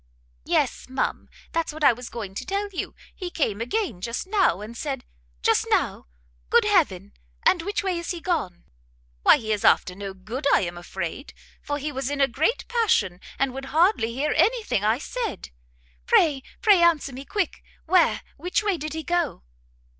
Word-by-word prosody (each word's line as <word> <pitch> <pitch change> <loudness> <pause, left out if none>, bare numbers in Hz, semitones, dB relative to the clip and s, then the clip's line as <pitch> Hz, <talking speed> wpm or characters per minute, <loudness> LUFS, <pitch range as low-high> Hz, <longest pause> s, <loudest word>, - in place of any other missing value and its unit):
"Yes, - - 0
ma'am, 260 - -2 0.2
that's 330 -1 -1
what 310 0 -7
I 275 - +7
was 245 +1 -8
going 210 -5 -6
to - - -4
tell 400 +1 -2
you; 380 - -5 0.2
he 365 -2 -5
came 225 - -1
again 245 - -2
just 235 - -3
now, 380 - +2
and 215 +3 -8
said" 270 -1 -4 0.4
"Just - - +3
now? - - 0 0.4
good - - +5
heaven! 65 +1 +2 0.3
and 345 - +4
which 405 +4 -2
way 370 -3 0
is 340 - -6
he 350 - -2
gone?" 315 - -2 0.6
"Why - - +7
he 220 -2 -4
is 210 -2 0
after 180 - +4
no 195 0 -7
good, 230 +9 -4
I - - +3
am 175 -1 -3
afraid, 175 - -6 0.3
for 290 - -3
he 295 +1 -3
was 270 -1 -3
in 285 0 -3
a 275 - +5
great 315 - 0
passion, 310 - +1 0.2
and 270 -2 0
would 270 +1 -6
hardly 315 - +2
hear 285 +5 0
any 445 +9 +3
thing 205 - 0
I 220 +2 +3
said." 440 - -5 0.6
"Pray, 290 -5 +4 0.2
pray 410 -5 +6
answer 320 -5 +3
me 265 +2 -7
quick! 390 +4 -2 0.2
where, 355 0 +3 0.2
which 360 +4 -1
way 405 -4 +1
did 310 0 -5
he 320 0 -4
go?" 345 -4 -1
290 Hz, 185 wpm, -25 LUFS, 225-350 Hz, 0.6 s, I